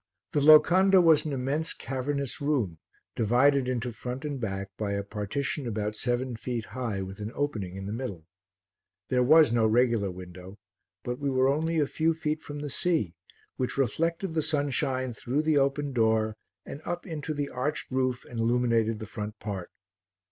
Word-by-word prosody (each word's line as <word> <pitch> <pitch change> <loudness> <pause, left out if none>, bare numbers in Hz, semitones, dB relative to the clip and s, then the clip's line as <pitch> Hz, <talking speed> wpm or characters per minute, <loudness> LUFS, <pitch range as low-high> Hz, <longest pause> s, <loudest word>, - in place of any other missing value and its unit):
The - - +1
locanda 180 +6 +7
was 165 -4 +5
an 155 - -2
immense, 140 +5 -1
cavernous 140 +2 -3
room 125 - 0 0.4
divided 125 +4 +3
into 125 -1 -2
front 125 +5 -6
and 145 -2 -3
back 100 -2 -3
by 100 -2 -2
a 100 0 -1
partition 110 +7 -3
about 105 -1 -2
seven 120 +2 -1
feet 115 -1 -4
high 115 -7 -3
with 95 +1 -8
an 105 +1 -4
opening 110 -11 -2
in 95 0 -6
the 100 - -4
middle. 105 -10 -5 0.8
There 125 -1 +2
was 150 -1 +6
no 115 -2 +4
regular 115 -3 +2
window, 90 +1 -10 0.5
but 125 +1 -4
we 140 -1 -1
were 130 0 +3
only 160 +4 0
a 150 - +3
few 160 +3 0
feet 155 -1 -2
from 145 -1 -7
the 145 - -4
sea 160 - 0 0.4
which 130 +1 -2
reflected 165 - 0
the 160 - +1
sunshine 135 -4 0
through 130 +6 -1
the 155 -2 +3
open 140 +1 0
door 110 -2 +2 0.3
and 145 - -8
up 175 0 -4
into 155 -3 -4
the 145 -1 -2
arched 140 +4 -3
roof 130 -1 0
and 120 - -7
illuminated 115 -1 +2
the 110 - -6
front 105 0 -6
part. 100 -4 -5
130 Hz, 175 wpm, -28 LUFS, 110-145 Hz, 0.8 s, locanda